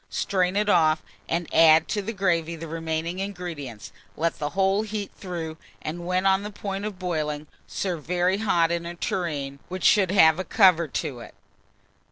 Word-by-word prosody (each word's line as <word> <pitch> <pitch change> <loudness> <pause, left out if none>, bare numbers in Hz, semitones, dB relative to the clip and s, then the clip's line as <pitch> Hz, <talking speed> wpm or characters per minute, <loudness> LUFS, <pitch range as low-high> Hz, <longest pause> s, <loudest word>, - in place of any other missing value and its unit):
Strain 185 -1 0
it 210 +1 +1
off, 160 -5 +3 0.3
and 170 0 -1
add 160 0 +6
to 205 - -1
the 210 +3 -4
gravy 170 -5 0
the 165 0 -7
remaining 165 +2 -3
ingredients; 160 - -6 0.3
let 165 +1 -1
the 150 - -2
whole 195 +1 +3
heat 215 -2 -4
through, 165 -4 -6 0.2
and, 170 +3 -6
when 185 +1 0
on 190 0 +4
the 210 - -5
point 200 -1 -5
of 210 -3 -5
boiling, 155 -5 -2 0.2
serve 175 -6 -3
very 180 +3 +1
hot 170 -6 +2
in 170 0 -2
a 175 - -6
tureen 145 -6 -3
which 185 +1 -5
should 195 -4 +5
have 160 -4 +5
a - - -1
cover 185 -6 +4
to 130 -2 -4
it. - - -12
175 Hz, 180 wpm, -25 LUFS, 160-195 Hz, 0.3 s, add